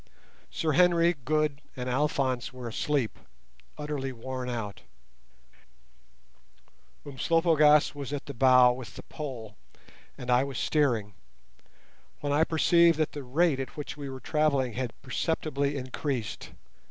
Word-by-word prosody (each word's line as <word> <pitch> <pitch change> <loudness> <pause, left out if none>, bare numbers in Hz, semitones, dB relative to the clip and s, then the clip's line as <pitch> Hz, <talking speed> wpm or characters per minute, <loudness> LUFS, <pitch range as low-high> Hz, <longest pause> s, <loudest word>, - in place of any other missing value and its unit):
Sir 160 - -1
Henry, 170 +1 +4
Good, 150 0 0
and 125 -2 -5
Alphonse 130 -2 0
were 125 -2 -8
asleep, 130 +1 -1 0.6
utterly 145 -3 -3
worn 130 +1 -5
out; 110 -4 -5 2.2
Umslopogaas 150 +1 +3
was 140 -2 -6
at 145 -2 -4
the 140 - -7
bow 125 0 +6
with 125 -2 -9
the - - -9
pole, 120 -8 -7 0.6
and 125 - -4
I 125 +1 +4
was 140 -2 -5
steering, 120 -9 +1 1.1
when 145 -1 -1
I 150 +2 +4
perceived 170 +1 +4
that 155 -1 0
the 145 - -6
rate 140 +3 +1
at 135 - -6
which 150 - -5
we 145 -2 -7
were 130 0 -7
travelling 140 -5 +1
had 125 -1 -4
perceptibly 140 0 -1
increased. 130 -3 -4
140 Hz, 130 wpm, -28 LUFS, 125-150 Hz, 2.2 s, bow